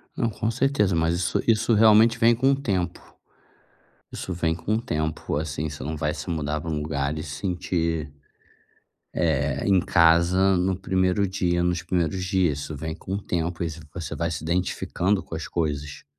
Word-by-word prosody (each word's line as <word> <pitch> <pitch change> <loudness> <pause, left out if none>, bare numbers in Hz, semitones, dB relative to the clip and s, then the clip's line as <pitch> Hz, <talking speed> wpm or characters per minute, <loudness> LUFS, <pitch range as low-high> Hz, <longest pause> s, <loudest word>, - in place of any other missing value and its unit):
Não, 115 - 0
com 110 +1 -2
certeza. 115 -6 +1
Mas, 80 +1 +1
isso 85 -1 0
isso 115 0 +3
realmente 110 +1 +6
vem 115 +1 +5
com 130 +4 +3
o - - +3
tempo. 95 - -2 1.1
Isso 95 - -5
vem 85 -2 0
com 100 +6 -1
o 110 - -1
tempo. 80 -8 -2
Assim, 75 0 -3
você 70 -2 -7
não 75 +3 -4
vai - - -1
se - - -7
mudar 75 -2 -2
pra 85 - -5
um 75 -2 -1
lugar 70 -1 -2
e 80 - -4
sentir 85 -1 -2 1.0
eh, 75 -4 0
em 95 -2 +5
casa, 85 +3 +4
no 90 +1 +1
1º 95 +1 +1
dia, 90 -2 0
nos 90 -1 0
primeiros 90 +1 -1
dias. 90 -6 +1
Isso 75 +2 -5
vem 80 +3 -5
com 95 - -7
o 100 - -4
tempo 85 -1 -2
e 85 - -1
ce 80 +1 -8
você 85 -4 -5
vai 85 0 -1
se 80 - -4
identificando 90 +3 0
com - - -7
as 80 - -5
coisas, 75 -3 -3
85 Hz, 185 wpm, -25 LUFS, 80-95 Hz, 1.1 s, realmente